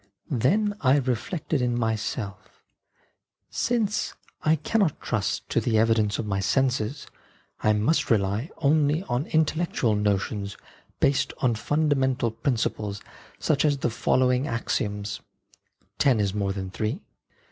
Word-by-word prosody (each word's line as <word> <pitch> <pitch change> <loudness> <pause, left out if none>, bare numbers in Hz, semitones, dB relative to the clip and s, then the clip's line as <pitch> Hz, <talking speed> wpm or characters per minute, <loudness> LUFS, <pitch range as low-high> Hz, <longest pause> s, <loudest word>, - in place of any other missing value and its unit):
Then 195 - +2
I 135 0 +5
reflected 135 +3 -1
in 120 -1 0
myself: 110 -3 -3 0.4
" - - -45 0.3
Since 225 -4 0 0.3
I 155 +1 +3
cannot 170 +2 0
trust 110 -5 -2
to - - +1
the 115 -2 +1
evidence 110 -2 +3
of - - -3
my 100 -2 -1
senses, 130 +4 0 0.6
I 110 - +3
must 110 +10 +1
rely 105 - +1
only 150 +2 +2
on 135 -4 -2
intellectual 155 -7 +1
notions 100 0 -1 0.4
based 140 -1 +2
on 125 -2 +2
fundamental 130 0 +1
principles, 110 -4 -2 0.4
such 150 -3 +1
as 145 -2 +3
the 120 - -1
following 125 +3 +2
axioms: 105 -3 -2 0.4
' - - -43
Ten 130 -5 +4
is 100 -2 0
more 100 -2 -1
than 95 -1 -5
three. 110 - -3
125 Hz, 130 wpm, -26 LUFS, 105-145 Hz, 0.6 s, I